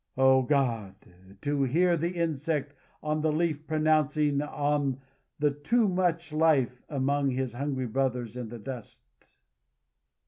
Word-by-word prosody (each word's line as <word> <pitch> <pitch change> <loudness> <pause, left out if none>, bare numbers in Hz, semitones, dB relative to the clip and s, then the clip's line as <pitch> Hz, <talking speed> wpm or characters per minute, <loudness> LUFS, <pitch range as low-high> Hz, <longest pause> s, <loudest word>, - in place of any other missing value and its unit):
Oh, 130 0 +5
God! 120 -7 0 0.5
to 145 -1 0
hear 170 +7 +3
the 170 +1 -1
insect 155 -3 -1 0.3
on 155 0 0
the 155 0 +2
leaf 155 -1 -1
pronouncing 155 -2 +2
on 145 -2 -1 0.4
the 150 0 +2
too 210 +11 +1
much 175 -4 0
life 140 -6 +2
among 140 -1 +1
his 130 -2 -2
hungry 135 0 -2
brothers 125 -1 -1
in 125 -3 -5
the 120 - -7
dust!" 120 - -8
145 Hz, 130 wpm, -28 LUFS, 130-155 Hz, 0.5 s, Oh